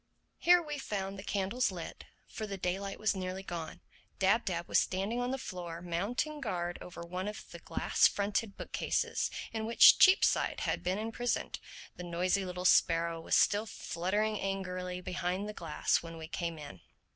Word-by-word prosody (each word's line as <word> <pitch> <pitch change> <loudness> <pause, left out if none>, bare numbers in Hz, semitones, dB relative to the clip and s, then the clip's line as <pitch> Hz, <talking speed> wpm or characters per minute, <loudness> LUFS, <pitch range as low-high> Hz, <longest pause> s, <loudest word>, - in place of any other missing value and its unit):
Here 350 0 +6
we 295 -2 -5
found 195 -5 -4
the - - -7
candles 205 +5 0
lit; 175 -4 -7 0.2
for 215 - -6
the 200 -1 -5
daylight 190 +2 -3
was 215 -1 +1
nearly 185 0 -4
gone. 170 -4 -6 0.4
Dab 200 +5 +3
Dab 170 -2 -2
was - - +4
standing 195 +6 -1
on 245 - -1
the 265 - -1
floor 175 -8 -6
mounting 205 - -2
guard 175 -7 -3
over 175 - -9
one 180 +3 -4
of 210 - -7
the - - -9
glass - - +3
fronted 205 +1 -2
book - - -8
cases - - 0 0.2
in 220 -1 -2
which 230 - +8
Cheapside 375 0 +5
had - - -1
been 185 +2 -1
imprisoned. 225 +3 -2 0.4
The 180 - -6
noisy 180 +3 0
little 180 0 -5
sparrow 165 -1 +3
was - - +1
still 210 +2 +3
fluttering 205 +4 -1
angrily 185 -2 -3
behind 180 +2 -2
the 210 - -5
glass - - 0
when 165 -1 -9
we 160 -1 -7
came 170 -1 -3
in. 95 - -10
190 Hz, 175 wpm, -32 LUFS, 175-215 Hz, 0.4 s, which